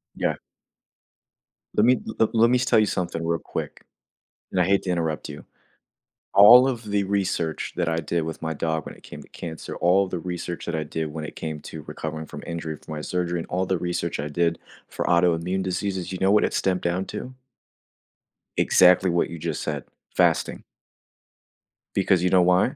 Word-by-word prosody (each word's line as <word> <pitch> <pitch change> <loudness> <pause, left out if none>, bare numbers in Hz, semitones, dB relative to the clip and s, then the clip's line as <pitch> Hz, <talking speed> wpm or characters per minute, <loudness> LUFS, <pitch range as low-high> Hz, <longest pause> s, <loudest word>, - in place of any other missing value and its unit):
Yeah. - - 0 1.4
Let 105 - +4
me 125 0 +4
le 110 - 0
let 115 0 +5
me 125 - +4
s 130 - 0
tell 120 -3 +4
you 110 - +4
something 85 -4 -2
real 85 0 0
quick, - - -6 0.7
and 95 - 0
I - - +5
hate 100 +1 +3
to 95 - -3
interrupt 80 -3 -1
you. 75 0 -9 0.9
All 120 +6 +9
of 120 -3 -2
the 100 -1 +2
research 95 -5 -1
that 85 -2 +1
I 80 - 0
did 85 +1 -1
with 80 0 -6
my 80 - -1
dog 80 0 -2
when - - -8
it - - -18
came - - -10
to - - -18
cancer, 80 -2 -7
all 95 +3 +3
the 90 -1 -4
research 90 0 -5
that 85 - -1
I 80 - -1
did 80 0 -3
when 80 0 -5
it - - -9
came 80 -2 -5
to 80 +1 -8
recovering 80 +1 -6
from - - -9
injury 85 -2 -4
from 80 - -10
my 75 - -4
surgery, 90 +1 -2
and 80 - -6
all 90 +1 -1
the 95 0 0
research 85 -2 -2
I 75 - -2
did 85 +2 0 0.3
for - - -4
autoimmune 90 +2 +2
diseases, 95 0 -3
you 95 - -4
know 95 +1 +4
what 105 - +5
it - - 0
stemmed 90 -1 0
down 90 +2 -1
to? 130 - -7 1.2
Exactly 90 +1 +5
what 85 - +1
you 85 - -7
just 85 +1 -3
said: 75 -3 -3 0.3
fasting. - - +2 1.3
Because 90 -3 +2
you 90 - +3
know 90 0 +5
why? 90 +7 +3
90 Hz, 200 wpm, -24 LUFS, 80-95 Hz, 1.4 s, All